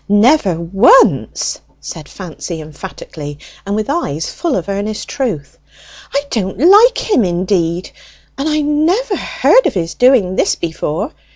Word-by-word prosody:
"Never 205 - +3
once!" 195 - +3 0.2
said 160 -3 -9
Fancy 170 -2 -7
emphatically, 150 -2 -9 0.3
and 200 - -1
with 215 0 -2
eyes 165 - -2
full 335 -6 -2
of 185 - -3
earnest 205 +2 -3
truth. 205 - -4 0.5
"I 280 - 0
don't 190 -4 -2
like 410 - +6
him 405 - +1
indeed, 175 -1 -1 0.4
and 280 +3 -2
I 305 0 +1
never 335 +10 +1
heard - - +2
of - - -3
his 165 -2 -2
doing 240 -8 +3
this - - +2
before! 170 - -3
205 Hz, 135 wpm, -15 LUFS, -, 0.5 s, like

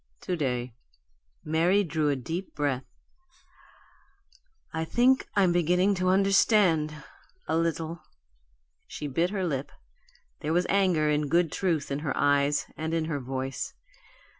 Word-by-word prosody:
"To 180 - -2
day." 125 -6 -2 0.7
Mary 170 +6 +3
drew 155 -4 0
a 145 - +1
deep 165 +9 -5
breath. 140 -4 -1 1.9
"I 160 0 -1
think 250 +9 +2
I'm 190 -3 +4
beginning 180 +3 +2
to 185 - +2
understand 185 -6 +3 0.4
a - - 0
little." 165 0 -1 0.9
She - - -7
bit 165 +5 0
her 195 -2 -2
lip; 140 -4 -3 0.7
there 155 - -2
was 175 +1 +2
anger 185 -6 +2
in 150 -1 0
good 170 0 +2
truth 165 -7 -1
in 140 - -1
her 150 -3 -3
eyes 145 0 +2
and 160 +1 -3
in 160 -1 0
her 155 -3 -2
voice. 130 +1 -4
160 Hz, 135 wpm, -27 LUFS, 145-180 Hz, 1.9 s, I'm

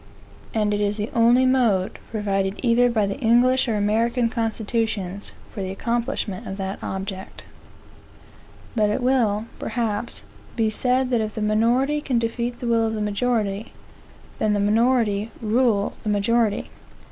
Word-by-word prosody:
And 210 -2 +1
it 205 - 0
is 205 +1 0
the 210 +1 -3
only 240 +2 +5
mode, 235 -8 +2
provided 195 -2 -1
either 245 0 +4
by 220 -3 +1
the 200 +7 -4
English 255 +2 +3
or 225 - 0
American 230 +4 +1
constitutions, 220 -4 -2 0.2
for 205 - -6
the 190 - -3
accomplishment 230 -2 -2
of 195 - -5
that 195 0 -4
object. 190 0 -6 1.3
But 210 -2 +3
it 215 +4 -1
will, 230 -5 +2
perhaps, 225 -1 -3 0.3
be 220 -2 +1
said 250 +3 +1
that 235 -2 +2
if 215 -1 -4
the 215 - -3
minority 240 +7 +2
can 260 -4 0
defeat 235 +1 -2
the 245 - -3
will 230 -1 +2
of 220 - -2
the - - -3
majority, 210 0 -1 0.7
then 215 -1 +2
the 205 - +1
minority 220 0 +2
rule 220 -2 +1
the 215 - -3
majority. 210 +1 +1
225 Hz, 150 wpm, -23 LUFS, 205-240 Hz, 1.3 s, only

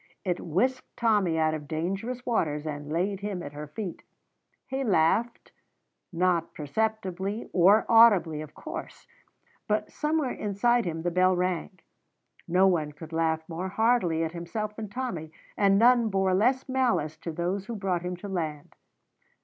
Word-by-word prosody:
It 180 -2 0
whisked 255 +11 -1
Tommy 205 -8 +2
out 155 -1 +2
of 150 -2 -5
dangerous 195 - -3
waters 155 -11 0
and 145 -1 -5
laid 190 +4 0
him 200 -3 -4
at 145 - -8
her 150 +1 -7
feet. 180 +4 -6 0.6
He 265 +1 -3
laughed, 215 +3 +1 0.6
not 175 -1 0
perceptibly 195 +4 -2
or 195 +5 +5
audibly, 205 -9 +5
of 155 -1 -10
course, - - -8 0.6
but - - 0
somewhere 300 -3 0
inside 230 +4 +1
him 165 -2 -3
the 175 - 0
bell 185 +1 +3
rang. 180 +1 -2 0.7
No 180 +3 +4
one 160 -6 +1
could 160 +2 -11
laugh 160 -1 0
more 180 +3 -4
heartily 200 -7 +2
at 160 - -2
himself 210 +5 -5
than 215 -2 -6
Tommy, 190 -10 -4 0.2
and 195 -1 +4
none 235 0 +5
bore 190 -1 +1
less 250 +7 +2
malice 245 - +1
to 165 +1 -6
those 180 +5 -2
who 235 - -4
brought 190 -4 -1
him 180 0 -4
to 205 - -8
land. 160 -6 -4
185 Hz, 155 wpm, -27 LUFS, 165-220 Hz, 0.7 s, or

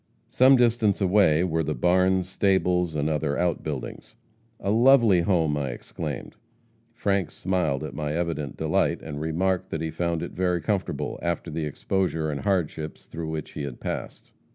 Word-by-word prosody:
Some 130 +2 +5
distance 115 -4 +3
away 95 -5 +4
were 80 -3 0
the 75 -1 -2
barns, 90 +1 +2
stables 90 -3 +1
and 75 0 0
other 75 -2 0
outbuildings. 85 -2 -3 0.4
'A 100 - -1
lovely 115 -5 +5
home!' 85 -5 +2
I 70 -2 -2
exclaimed. - - -6 0.6
Frank 100 -7 0
smiled 90 -8 -1
at - - -6
my 75 -1 -3
evident 80 -5 -3
delight, - - 0
and 75 -1 -6
remarked 90 +4 0
that 80 - -3
he 80 -1 -2
found 85 0 -1
it - - -5
very 90 -1 0
comfortable, 100 0 -2
after 85 -1 -2
the 80 0 -2
exposure 80 +1 -1
and 70 - -4
hardships 80 -5 -2
through 80 -1 -6
which 80 -1 -5
he - - -6
had 70 -4 -6
passed. - - -6
85 Hz, 160 wpm, -25 LUFS, 80-95 Hz, 0.6 s, Some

